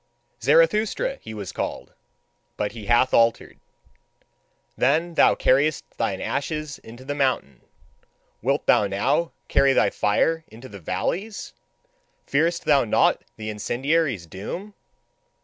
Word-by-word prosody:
Zarathustra 270 Hz, -, +2 dB
he -, -, -9 dB
was 100 Hz, -5 st, -6 dB
called; -, -, -5 dB, 0.6 s
but 105 Hz, -1 st, -1 dB
he 110 Hz, -3 st, -9 dB
hath 120 Hz, +2 st, +3 dB
altered. 115 Hz, 0 st, +2 dB, 1.2 s
Then 160 Hz, +6 st, +1 dB
thou -, -, +5 dB
carriedst 140 Hz, +4 st, +2 dB
thine -, -, -1 dB
ashes 150 Hz, 0 st, -3 dB
into 120 Hz, +3 st, -13 dB
the 145 Hz, -, -3 dB
mountains: 130 Hz, -, -1 dB, 0.8 s
wilt -, -, 0 dB
thou 105 Hz, -, +4 dB
now 135 Hz, +12 st, 0 dB, 0.2 s
carry 135 Hz, 0 st, +4 dB
thy 100 Hz, -, +3 dB
fire 160 Hz, +10 st, +1 dB
into 115 Hz, +4 st, -12 dB
the 100 Hz, -3 st, -11 dB
valleys? 185 Hz, -, -3 dB, 0.7 s
Fearest 165 Hz, +4 st, 0 dB
thou 145 Hz, -2 st, +4 dB
not 110 Hz, -, +2 dB
the 110 Hz, 0 st, -5 dB
incendiary's 130 Hz, -, -1 dB
doom? 140 Hz, -, -7 dB
135 Hz, 120 wpm, -24 LUFS, 110-160 Hz, 1.2 s, thou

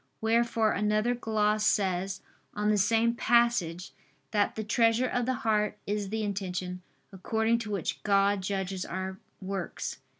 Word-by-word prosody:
Wherefore 225 Hz, -1 st, +2 dB
another 210 Hz, +3 st, +1 dB
gloss 215 Hz, -3 st, 0 dB
says 190 Hz, -2 st, +1 dB, 0.3 s
on 210 Hz, 0 st, +1 dB
the 210 Hz, -, +2 dB
same 225 Hz, +3 st, +3 dB
passage 235 Hz, -8 st, +2 dB, 0.4 s
that 205 Hz, -1 st, +1 dB
"the 220 Hz, -, -3 dB
treasure 230 Hz, +2 st, +3 dB
of 245 Hz, -1 st, -1 dB
the 260 Hz, -, +1 dB
heart 210 Hz, -2 st, +1 dB
is 205 Hz, -1 st, -2 dB
the 220 Hz, +1 st, -2 dB
intention, 185 Hz, -3 st, -3 dB, 0.3 s
according 220 Hz, +4 st, 0 dB
to 220 Hz, -2 st, -6 dB
which 195 Hz, -6 st, -3 dB
God 200 Hz, -1 st, +2 dB
judges 190 Hz, -1 st, -2 dB
our 190 Hz, +1 st, -5 dB, 0.2 s
works." 190 Hz, -2 st, -4 dB
210 Hz, 140 wpm, -29 LUFS, 190-225 Hz, 0.4 s, same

